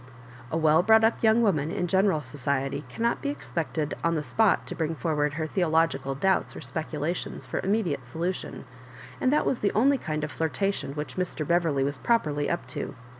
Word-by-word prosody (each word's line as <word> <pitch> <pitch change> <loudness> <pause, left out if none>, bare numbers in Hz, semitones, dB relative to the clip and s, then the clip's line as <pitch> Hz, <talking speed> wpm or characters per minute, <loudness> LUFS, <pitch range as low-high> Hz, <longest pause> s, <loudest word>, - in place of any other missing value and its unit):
A 160 - 0
well 160 0 +4
brought 220 +3 +5
up 225 +1 +2
youngs 225 +1 +4
woman 155 -8 +2
in 180 +1 -1
general 190 -3 +2
society 135 +1 -2
cannot 235 - -1
be 285 - -1
ex 290 - -7
pected 155 -2 -1
on 165 0 +2
the 150 - -1
spot 220 +6 +2
to - - -4
bring 160 -1 -1
forward 150 -2 0
her 155 +1 -2
theologi 160 -4 +1
cal 135 0 -3
doubts 190 +8 +1
or - - -7
speculations 160 +1 -4
for - - -3
immediate 185 - 0
solution; 165 +9 -4 0.6
and 255 - +3
that 300 - +2
was 255 - 0
the 200 - +1
only 270 +5 +3
kind 155 -2 -3
of 155 - -3
flirtation 165 +3 -1
which 150 -3 -6
Mr. 170 -4 -2
Beverley 165 -6 +2
was 140 -1 -2
prqperly 150 - +1
up 170 - -2
to. - - -5
165 Hz, 195 wpm, -27 LUFS, 150-195 Hz, 0.6 s, brought